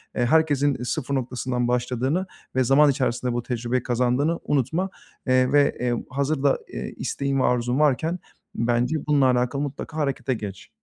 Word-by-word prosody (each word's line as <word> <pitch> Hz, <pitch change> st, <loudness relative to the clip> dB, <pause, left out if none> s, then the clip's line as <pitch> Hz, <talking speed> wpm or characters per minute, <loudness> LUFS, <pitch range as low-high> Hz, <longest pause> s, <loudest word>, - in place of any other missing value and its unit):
eee, 120 Hz, -, +1 dB
herkesin 145 Hz, -2 st, +2 dB
sıfır 140 Hz, +1 st, -2 dB
noktasından 125 Hz, -1 st, -2 dB
başladığını 125 Hz, +8 st, 0 dB, 0.3 s
ve 130 Hz, -, +3 dB
zaman 140 Hz, +4 st, +5 dB
içerisinde 125 Hz, -2 st, -1 dB
bu 120 Hz, 0 st, -2 dB
tecrübeyi 120 Hz, 0 st, -2 dB
kazandığını 125 Hz, +7 st, +1 dB
unutma, 150 Hz, +7 st, 0 dB, 0.4 s
eee, 130 Hz, 0 st, +3 dB
ve, 145 Hz, 0 st, +3 dB
eee, 125 Hz, -1 st, 0 dB, 0.2 s
hazır 140 Hz, +2 st, -1 dB
da, 140 Hz, -, +4 dB, 0.2 s
eee, -, -, -5 dB
isteğin 140 Hz, -1 st, -1 dB
ve -, -, +2 dB
arzun 125 Hz, +2 st, +1 dB
varken 155 Hz, +4 st, +2 dB, 0.4 s
bence 120 Hz, +5 st, +1 dB
bununla 145 Hz, -2 st, +4 dB
alakalı 125 Hz, +3 st, +1 dB
mutlaka 145 Hz, +2 st, -5 dB
harekete 140 Hz, -2 st, -1 dB
geç. 105 Hz, -4 st, -7 dB
130 Hz, 155 wpm, -24 LUFS, 125-145 Hz, 0.4 s, zaman